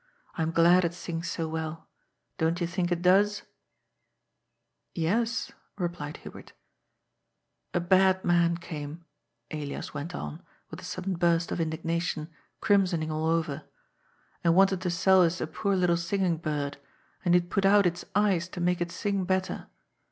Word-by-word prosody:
I -, -, -3 dB
am 160 Hz, -, +1 dB
glad 170 Hz, +2 st, +5 dB
it 170 Hz, 0 st, -1 dB
sings 170 Hz, -1 st, -4 dB
so 165 Hz, -2 st, -2 dB
well. 160 Hz, 0 st, -5 dB, 0.5 s
Don't 165 Hz, +2 st, +1 dB
yon 170 Hz, -, 0 dB
think 175 Hz, 0 st, -2 dB
it 175 Hz, 0 st, -1 dB
does? 205 Hz, +3 st, +4 dB, 0.6 s
" -, -, -52 dB
" -, -, -52 dB, 0.2 s
Yes," 230 Hz, +1 st, 0 dB, 0.3 s
replied 175 Hz, -5 st, -4 dB
Hubert -, -, -11 dB, 0.7 s
" -, -, -51 dB
A -, -, +3 dB
bad 190 Hz, +1 st, +3 dB
man 170 Hz, -1 st, +3 dB
came," 160 Hz, -1 st, -7 dB, 0.5 s
Elias 150 Hz, -2 st, -5 dB
went 150 Hz, +4 st, -5 dB
on, 75 Hz, -1 st, -6 dB, 0.3 s
with -, -, -8 dB
a -, -, -9 dB
sudden 185 Hz, +1 st, -3 dB
burst 170 Hz, 0 st, +2 dB
of -, -, -1 dB
indignation, 165 Hz, 0 st, -2 dB, 0.3 s
crimsoning 185 Hz, -7 st, +2 dB
all 155 Hz, +1 st, -1 dB
over, 160 Hz, -4 st, 0 dB
^' 155 Hz, -, -12 dB, 0.8 s
and 170 Hz, 0 st, +4 dB
wanted 190 Hz, -1 st, +4 dB
to 185 Hz, -, -1 dB
sell 185 Hz, +2 st, +4 dB
us 175 Hz, 0 st, +2 dB
a -, -, -1 dB
poor 200 Hz, -2 st, -1 dB
little 180 Hz, -2 st, +2 dB
singing 175 Hz, 0 st, 0 dB
bird, 150 Hz, -3 st, -3 dB, 0.4 s
and 175 Hz, -1 st, +4 dB
he -, -, +7 dB
had 175 Hz, +2 st, -15 dB
put 195 Hz, -, +1 dB
out 200 Hz, 0 st, +5 dB
its 175 Hz, 0 st, 0 dB
eyes 195 Hz, -4 st, +2 dB
to 180 Hz, -, -7 dB
make 175 Hz, 0 st, +1 dB
it 175 Hz, 0 st, -1 dB
sing 200 Hz, -1 st, -1 dB
better. 185 Hz, 0 st, -1 dB
175 Hz, 170 wpm, -28 LUFS, 165-185 Hz, 0.8 s, he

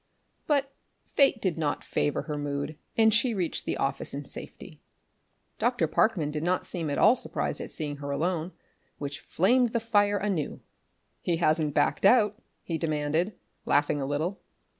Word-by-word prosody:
But 275 Hz, -2 st, +1 dB, 0.3 s
fate 275 Hz, -4 st, +3 dB
did 185 Hz, -6 st, -1 dB
not 150 Hz, -2 st, -1 dB
favour 145 Hz, -, -1 dB
her 150 Hz, -, -4 dB
mood, 145 Hz, +1 st, -3 dB, 0.2 s
and 220 Hz, -1 st, +5 dB
she 235 Hz, +1 st, +2 dB
reached 180 Hz, -4 st, -2 dB
the -, -, -1 dB
office -, -, -2 dB
in -, -, -5 dB
safety. -, -, -10 dB, 0.8 s
Dr. -, -, +2 dB
Parkman 175 Hz, -10 st, +1 dB
did 150 Hz, 0 st, -3 dB
not 180 Hz, +3 st, 0 dB
seem 165 Hz, -4 st, -3 dB
at 140 Hz, -, -1 dB
all 220 Hz, -, +7 dB
surprised -, -, -2 dB
at -, -, -6 dB
seeing 145 Hz, -3 st, -4 dB
her 140 Hz, 0 st, -6 dB
alone, 165 Hz, +4 st, -1 dB, 0.5 s
which 145 Hz, +1 st, -5 dB
flamed 235 Hz, +9 st, +2 dB
the 235 Hz, -, +2 dB
fire 205 Hz, -2 st, +2 dB
anew. 195 Hz, -7 st, -2 dB, 0.6 s
"He 170 Hz, -2 st, 0 dB
hasn't 155 Hz, -3 st, +2 dB
backed 145 Hz, -, +2 dB
out?" 210 Hz, +1 st, +4 dB, 0.2 s
he 165 Hz, -2 st, -3 dB
demanded, 155 Hz, +4 st, 0 dB, 0.3 s
laughing 145 Hz, 0 st, +2 dB
a 135 Hz, -, -2 dB
little. 155 Hz, +7 st, -2 dB
170 Hz, 160 wpm, -28 LUFS, 150-210 Hz, 0.8 s, all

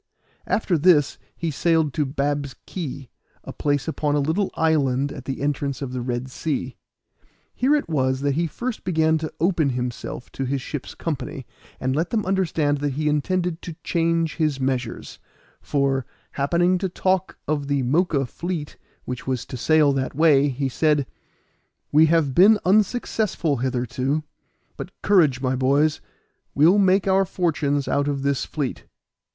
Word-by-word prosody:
After 185 Hz, -6 st, +1 dB
this 150 Hz, -3 st, +4 dB, 0.2 s
he 165 Hz, -2 st, -3 dB
sailed 160 Hz, -1 st, +1 dB
to 150 Hz, -3 st, 0 dB
Bab's 140 Hz, -1 st, -2 dB
Key, 140 Hz, -7 st, -6 dB, 0.3 s
a -, -, -8 dB
place 145 Hz, 0 st, -1 dB
upon 150 Hz, -2 st, 0 dB
a -, -, +2 dB
little 160 Hz, +8 st, 0 dB
island 140 Hz, -4 st, +1 dB
at 130 Hz, -, -9 dB
the 135 Hz, +1 st, -4 dB
entrance 140 Hz, -2 st, -1 dB
of 135 Hz, -3 st, -5 dB
the 125 Hz, -, -3 dB
Red 125 Hz, +1 st, -3 dB
Sea. 130 Hz, -3 st, -3 dB, 0.8 s
Here 270 Hz, +5 st, +2 dB
it 295 Hz, -, -1 dB
was 130 Hz, -4 st, 0 dB
that 140 Hz, 0 st, +1 dB
he 165 Hz, +4 st, 0 dB
first 235 Hz, -, -5 dB
began 160 Hz, -2 st, +2 dB
to 155 Hz, 0 st, -4 dB
open 165 Hz, -3 st, +2 dB
himself 125 Hz, -1 st, -5 dB
to 135 Hz, -, -4 dB
his 135 Hz, +2 st, -1 dB
ship's 135 Hz, +1 st, -6 dB
company, 135 Hz, -4 st, -4 dB, 0.3 s
and 130 Hz, +1 st, -1 dB
let 165 Hz, +3 st, 0 dB
them 220 Hz, -3 st, -1 dB
understand 165 Hz, -6 st, +1 dB
that 145 Hz, -1 st, -1 dB
he 150 Hz, +3 st, -1 dB
intended 175 Hz, +3 st, -1 dB
to 170 Hz, -, -7 dB
change 165 Hz, -1 st, 0 dB
his 155 Hz, -4 st, 0 dB
measures; 130 Hz, -3 st, -3 dB, 0.4 s
for, 135 Hz, -3 st, 0 dB, 0.2 s
happening 175 Hz, +6 st, +1 dB
to 190 Hz, 0 st, -1 dB
talk 185 Hz, +1 st, 0 dB
of 145 Hz, -1 st, -1 dB
the 140 Hz, -2 st, 0 dB
Moca 140 Hz, 0 st, +1 dB
fleet 170 Hz, +2 st, -5 dB, 0.3 s
which 125 Hz, 0 st, -6 dB
was 130 Hz, -2 st, -2 dB
to -, -, -8 dB
sail 150 Hz, +3 st, +3 dB
that 135 Hz, -1 st, -2 dB
way, 145 Hz, -2 st, +4 dB
he 135 Hz, +1 st, -2 dB
said, 150 Hz, +1 st, +1 dB, 0.9 s
"We 155 Hz, +2 st, +6 dB
have 155 Hz, -4 st, +2 dB
been 200 Hz, +8 st, +7 dB
unsuccessful 205 Hz, -, +1 dB
hitherto; 130 Hz, +4 st, -1 dB, 0.5 s
but -, -, -9 dB
courage, 155 Hz, -11 st, +4 dB
my 130 Hz, -1 st, 0 dB
boys, 140 Hz, +4 st, +2 dB, 0.5 s
we'll 165 Hz, +8 st, +5 dB
make 190 Hz, 0 st, +3 dB
our 195 Hz, 0 st, +4 dB
fortunes 155 Hz, -6 st, -1 dB
out 145 Hz, 0 st, +1 dB
of 140 Hz, -2 st, -2 dB
this 140 Hz, -1 st, 0 dB
fleet." 145 Hz, -4 st, -4 dB
145 Hz, 160 wpm, -23 LUFS, 135-170 Hz, 0.9 s, been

